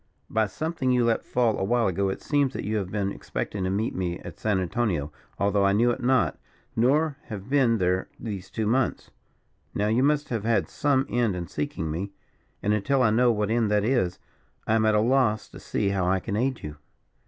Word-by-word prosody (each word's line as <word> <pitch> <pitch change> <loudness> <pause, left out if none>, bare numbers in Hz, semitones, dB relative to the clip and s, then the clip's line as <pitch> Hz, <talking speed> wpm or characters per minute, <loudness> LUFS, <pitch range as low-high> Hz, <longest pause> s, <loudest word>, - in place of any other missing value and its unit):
By 110 -1 +2
something 155 - -2
you 125 -1 +3
let 115 -1 +1
fall 120 -3 +1
a - - 0
while 120 +3 +2
ago, 95 0 +1
it 95 - -5
seems 145 -3 +1
that - - -4
you 110 +1 0
have 95 -3 -3
been 100 -1 -1
expecting 95 +9 -4
to - - 0
meet 105 +5 -1
me 90 -2 -2
at - - -10
San 105 -3 +1
Antonio, 90 -6 -1 0.3
although 100 0 +2
I 100 0 +4
knew 120 +4 +3
it 125 - -4
not, 130 0 +2 0.4
nor 140 +5 +2
have 105 +2 -8
been 130 -5 +4
there 90 -1 0
these 100 -5 -6
two 110 - -2
months. 120 +4 0 0.6
Now, 105 +1 +1
you 115 +3 +2
must 145 +1 +2
have 115 -4 -2
had 115 0 +1
some 140 -3 +1
end 120 -5 +1
in 90 -1 -4
seeking 80 0 -3
me; 95 +5 -4 0.5
and, 105 - +2
until 130 +6 +2
I 110 - +4
know 120 +2 +4
what 105 -1 -1
end 115 -2 +2
that 105 -1 +2
is, 110 -7 +1 0.5
I 110 - +1
am 110 -1 +3
at 110 - +3
a - - +4
loss 120 -3 +2
to - - -11
see 100 -2 -1
how 95 -2 0
I 95 +1 +2
can 100 +2 -4
aid 130 +3 -1
you." 75 0 -7
110 Hz, 220 wpm, -26 LUFS, 100-125 Hz, 0.6 s, I